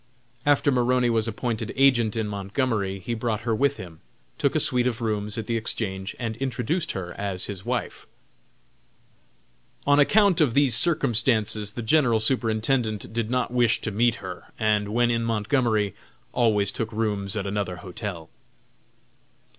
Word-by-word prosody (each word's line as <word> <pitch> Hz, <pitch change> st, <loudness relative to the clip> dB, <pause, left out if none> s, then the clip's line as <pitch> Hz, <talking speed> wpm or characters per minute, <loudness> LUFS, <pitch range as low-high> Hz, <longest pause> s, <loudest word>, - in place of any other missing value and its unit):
After 145 Hz, 0 st, +4 dB
Maroney 125 Hz, -1 st, +2 dB
was 115 Hz, -1 st, +1 dB
appointed 115 Hz, 0 st, -3 dB
agent 125 Hz, -5 st, +3 dB
in 110 Hz, -2 st, -1 dB
Montgomery 100 Hz, 0 st, -2 dB
he 95 Hz, +5 st, -5 dB
brought 115 Hz, -2 st, -2 dB
her 115 Hz, 0 st, -1 dB
with 140 Hz, +5 st, +1 dB
him, 85 Hz, -3 st, -10 dB, 0.4 s
took -, -, +1 dB
a -, -, +3 dB
suite 125 Hz, 0 st, +2 dB
of 120 Hz, -3 st, -2 dB
rooms 105 Hz, -2 st, -2 dB
at 110 Hz, -, -3 dB
the 115 Hz, -, -2 dB
Exchange, 95 Hz, -4 st, -2 dB
and 115 Hz, -2 st, -3 dB
introduced 135 Hz, +6 st, -2 dB
her 90 Hz, -2 st, -5 dB
as 95 Hz, -3 st, -1 dB
his 95 Hz, -2 st, -6 dB
wife. -, -, -3 dB, 1.8 s
On 145 Hz, 0 st, +4 dB
account 195 Hz, +3 st, +4 dB
of 135 Hz, -7 st, +2 dB
these 140 Hz, -5 st, +4 dB
circumstances 115 Hz, -7 st, +1 dB
the 120 Hz, -, -5 dB
General 120 Hz, -2 st, +3 dB
Superintendent 110 Hz, -1 st, 0 dB
did 115 Hz, -1 st, -2 dB
not 125 Hz, -1 st, -1 dB
wish 120 Hz, -2 st, +3 dB
to 110 Hz, -, -3 dB
meet 115 Hz, +3 st, +2 dB
her, 90 Hz, -2 st, -8 dB
and, 105 Hz, -1 st, +1 dB
when 120 Hz, +3 st, +1 dB
in 115 Hz, 0 st, 0 dB
Montgomery, 110 Hz, -2 st, 0 dB, 0.4 s
always 105 Hz, -4 st, +2 dB
took 110 Hz, +2 st, -4 dB
rooms 105 Hz, -3 st, -2 dB
at 100 Hz, -, -2 dB
another 100 Hz, -2 st, -2 dB
hotel. 90 Hz, -3 st, -6 dB
110 Hz, 155 wpm, -25 LUFS, 105-125 Hz, 1.8 s, After